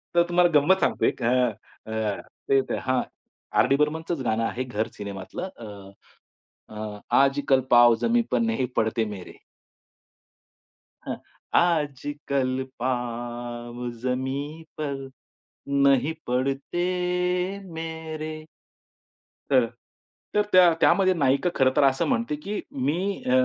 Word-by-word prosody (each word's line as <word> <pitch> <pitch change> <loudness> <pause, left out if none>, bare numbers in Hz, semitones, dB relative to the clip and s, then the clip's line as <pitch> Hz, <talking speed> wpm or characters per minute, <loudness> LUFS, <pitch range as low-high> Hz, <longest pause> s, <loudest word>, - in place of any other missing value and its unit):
तर 170 - +6
तुम्हाला 175 0 +4
गंमत 190 +7 +3
सांगतोय - - +2
अ, 125 0 +3 0.4
अ, 110 -2 -2 0.5
ते - - -1
हां, 130 -1 0 0.6
आरडी 135 - +4
बर्मनचं 155 0 -1
गाणं 115 0 +1
आहे. 120 +2 -2
घर 115 -3 -2
सिनेमातलं 100 - -6
अ, 115 - -9 1.1
अ, 105 -1 -6 0.2
आजकल 135 -1 +3
पाव 120 -1 +7
जमी 235 +1 +3
पर 125 - +2
नही 115 +3 0
पडते 110 +1 +1
मेरे. 90 - -12 1.7
हां. - - -2 0.4
"आजकल 145 -5 0 0.2
पाँव 120 -1 -4
जमीन 135 +5 -3 0.2
पर 140 -3 -4 0.8
नहीं 140 +3 +3
पडते 135 +7 -1 0.9
मेरे." 160 -1 -5 1.1
तर 130 -3 +5 0.7
तर 210 - +5
त्या 180 -2 +7
त्यामध्ये 190 -1 +5
नायिका 140 +1 +2
खरंतर 130 +1 +3
असं 135 -1 +3
म्हणते 235 - 0
की 200 +8 -5 0.3
"मी 180 +7 -1
अ, - - 0
135 Hz, 105 wpm, -25 LUFS, 120-160 Hz, 1.7 s, पाव